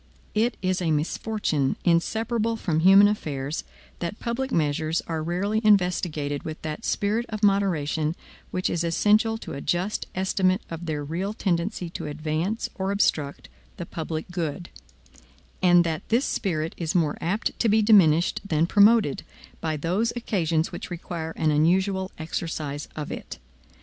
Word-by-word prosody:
It 225 +3 +1
is 185 0 0
a 170 - 0
misfortune, 155 -1 0
inseparable 225 +6 +1
from 170 -8 -1
human 195 +4 +7
affairs, 150 -8 -3 0.4
that 175 +4 -4
public 260 +3 -2
measures 155 0 0
are 160 -2 -3
rarely 190 +7 -1
investigated 175 -8 +2
with 155 0 -6
that 155 +8 -5
spirit 215 +4 0
of 215 -1 -5
moderation 165 -6 +1 0.3
which 185 - -1
is 170 - -1
essential 210 +6 +3
to - - -8
a 140 - -5
just 180 +7 -1
estimate 190 +1 +1
of 165 +1 -6
their 150 -2 -2
real 175 +8 -3
tendency 180 0 -1
to - - -5
advance 155 +8 -2
or 190 0 -3
obstruct 150 -8 0 0.3
the - - -5
public 160 -1 -4
good; 175 -1 -3 0.9
and 175 -1 +6
that 160 -2 -2
this 235 +5 +3
spirit 160 -5 -1
is 165 -1 -3
more 160 -4 +2
apt 195 +7 -1
to 230 - +3
be 215 +1 +4
diminished 175 -6 +5
than 160 -5 +1
promoted, 205 -3 +4 0.4
by 155 -1 -2
those 185 +10 0
occasions 170 -9 0
which - - -7
require 170 -2 -5
an 155 -1 +1
unusual 190 +5 +2
exercise 155 -3 -4
of 150 -1 -5
it. - - -7
175 Hz, 150 wpm, -25 LUFS, 155-205 Hz, 0.9 s, human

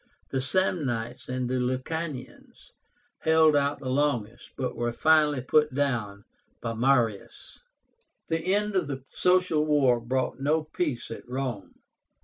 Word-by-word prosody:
The 135 - 0
Samnites 130 -8 -1
and 130 -1 -2
Lucanians 130 +3 -4 0.5
held 160 -1 +4
out 145 0 +1
the 130 - -6
longest, 125 -4 -1
but 130 -2 -3
were 120 0 -1
finally 150 0 +3
put 150 +2 +2
down 115 -8 -1 0.3
by 115 - -3
Marius. 115 -3 0 0.7
The 165 +3 -1
end 210 0 -1
of 180 -5 +1
the 135 -2 -5
Social 180 -4 +2
War 140 -5 +3
brought 130 +3 -2
no 155 +3 +1
peace 150 -7 -3
at 115 - -9
Rome. 125 -5 -4
135 Hz, 125 wpm, -27 LUFS, 125-155 Hz, 0.7 s, held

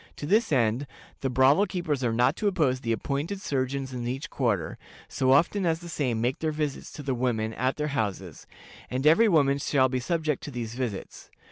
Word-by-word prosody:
To - - -6
this 215 +6 +2
end, 125 0 +1 0.3
the 135 - -1
brothel 135 +10 +4
keepers 155 -8 -2
are 120 - +1
not 125 +6 +2
to 210 - 0
oppose 145 -10 +1
the 115 -2 -2
appointed 145 - -2
surgeons 135 -4 -2
in 120 -1 -4
each 135 +6 -4
quarter, 115 -10 -1 0.3
so 130 0 +1
often 170 +8 +3
as 165 -2 +1
the 170 +1 -10
same 130 -8 -1
make 120 +3 -1
their 160 -1 -1
visits 150 -2 -3
to 150 - -8
the 135 -1 -1
women 115 -3 -1
at 130 +3 0
their 150 0 -2
houses; 100 - -3 0.4
and 130 +2 -2
every 165 +9 +6
woman 140 -5 +3
shall 130 -2 +2
be 130 0 -1
subject 155 +1 -1
to - - -5
these 120 -4 -5
visits. 120 -6 -5
135 Hz, 205 wpm, -27 LUFS, 125-155 Hz, 0.4 s, every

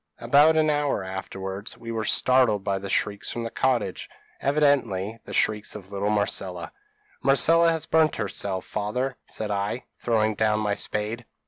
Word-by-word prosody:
p> - - -10
"About 145 +6 +5
an 155 -1 +3
hour 145 -8 0
afterwards 95 +1 -6
we 115 - -7
were 110 -1 -2
startled 125 -6 +3
by 100 -1 -1
shrieks 100 +1 -1
from 120 - -3
the 115 - -5
cottage 120 -9 -1 0.3
evidently 125 -8 +1
the - - -9
shrieks 105 -1 0
of 100 -2 -10
little 100 +1 -1
Marcella. 100 -3 -1 0.5
'Marcella 165 +5 +5
has 160 -1 -1
burnt 160 -2 +3
herself, 100 -3 -2
father,' 125 +6 -2
said 105 -1 -5
I, 100 +4 -2
throwing 110 -2 +1
down 105 0 +1
my 105 -1 0
spade. 105 +3 -4
110 Hz, 155 wpm, -25 LUFS, 100-130 Hz, 0.5 s, About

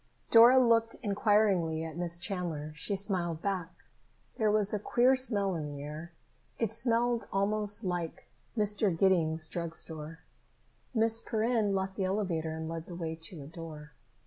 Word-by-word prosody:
Dora 235 +3 +8
looked 230 -2 +3
inquiringly 200 -6 +2
at 160 -2 -6
Miss 170 0 0
Chandler. 170 -5 -3
She 200 +7 -2
smiled 180 -5 -1
back. 185 -4 -1 0.7
There 215 -1 +3
was 210 -1 +1
a 210 - 0
queer 245 +5 +3
smell 205 -7 +2
in 155 -3 -3
the 145 -1 -7
air. 155 +4 -7 0.5
It 225 -3 -1
smelled 235 0 0
almost 210 +2 0
like 175 -3 -3 0.3
Mr. 210 -4 +1
Giddings' 165 -4 +2
drug 170 0 -4
store. 160 0 -6 0.7
Miss 225 0 +3
Perrin 220 -3 0
left 190 0 -2
the 195 - 0
elevator 180 -5 -1
and 160 0 -5
led 165 0 -5
the 175 - -8
way 165 -2 -4
to 160 -1 -5
a - - -10
door. 155 -1 -9
190 Hz, 155 wpm, -31 LUFS, 165-215 Hz, 0.7 s, Dora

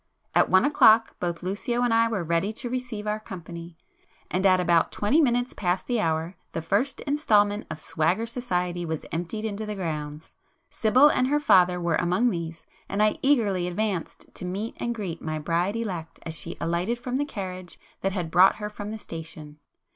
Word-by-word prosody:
At - - +4
one 185 +6 +5
o'clock, 225 -6 +5
both 175 -1 -3
Lucio 225 +6 -1
and 240 -2 +2
I 230 0 +4
were 215 -6 -2
ready 170 +5 0
to 240 +2 -5
receive 245 -4 -4
our 210 0 -1
company,—and 175 0 -6
at 185 -1 +5
about 170 -2 +3
twenty 270 +11 +2
minutes 245 -3 +1
past 180 -1 -1
the 245 -2 0
hour, 165 -1 0 0.2
the 165 - -2
first 210 +11 0
instalment 210 -8 +2
of - - -5
'swagger 170 +7 0
society' 180 -8 -2
was 160 -2 -4
emptied 180 +7 -3
into 215 0 -3
the 210 -1 -4
grounds. 150 -4 -5 0.4
Sibyl 255 +6 +5
and 255 -3 +2
her 295 +2 +2
father 180 -9 +4
were 170 -2 +1
among 185 +8 +2
these,—and 170 +4 -4
I 215 - +2
eagerly 210 -10 +2
advanced 185 -1 -3
to - - -6
meet 195 +5 -3
and 235 0 -2
greet 185 -7 -5
my 155 0 -3
bride 170 +6 0
elect 185 -8 -4
as 165 - -4
she 170 +1 -4
alighted 175 +8 -1
from 250 +1 -3
the 285 - +1
carriage 185 - -7 0.2
that 195 - 0
had 180 -4 -3
brought 185 +2 +6
her 210 0 -5
from 205 0 -6
the 220 - -5
station. 160 -5 -9
195 Hz, 185 wpm, -26 LUFS, 170-225 Hz, 0.4 s, brought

